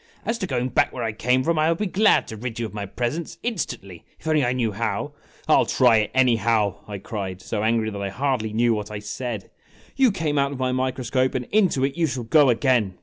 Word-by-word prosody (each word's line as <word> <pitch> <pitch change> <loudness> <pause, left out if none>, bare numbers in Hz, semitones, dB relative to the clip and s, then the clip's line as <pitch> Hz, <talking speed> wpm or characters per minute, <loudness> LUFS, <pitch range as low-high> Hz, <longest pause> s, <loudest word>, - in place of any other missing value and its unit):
As 230 +1 -1
to 190 - -2
going 125 -3 -1
back - - +2
where 125 - -5
I 115 - -1
came 125 +4 +1
from, 165 +1 +1
I 155 +1 +3
would 165 - +1
be 210 - -1
glad 205 +3 +3
to 110 - -6
rid 115 +1 -6
you 115 - -1
of 110 - -8
my 100 -1 -5
presence 125 - -3
in 240 - 0
stantly 100 - -6 0.2
if - - -21
only 155 -2 +3
I 120 - +1
knew 120 -4 0
how." 115 +3 -3 0.3
"I - - +4
'11 - - +3
try 115 - +5
it, 105 -1 0
anyhow! 115 -5 +2
" - - -29
I 105 -1 -5
cried, 95 -2 -5
so 105 +3 -4
angry 110 -1 +1
that 100 -1 -6
I 100 - -2
hardly 125 -1 -1
knew 115 +2 +2
what 105 -1 -4
I 105 - -5
said. 105 +1 -5 0.2
" - - -27
You 265 -2 +4
came 160 -6 -1
out 140 0 +1
of - - -6
my 130 0 0
microscope, 130 0 0
and 125 -1 -2
into 190 -10 +2
it 140 +4 -4
you 165 -1 +2
shall 130 -3 -4
go 145 +4 +4
again 120 -6 +2
125 Hz, 260 wpm, -23 LUFS, 110-140 Hz, 0.3 s, try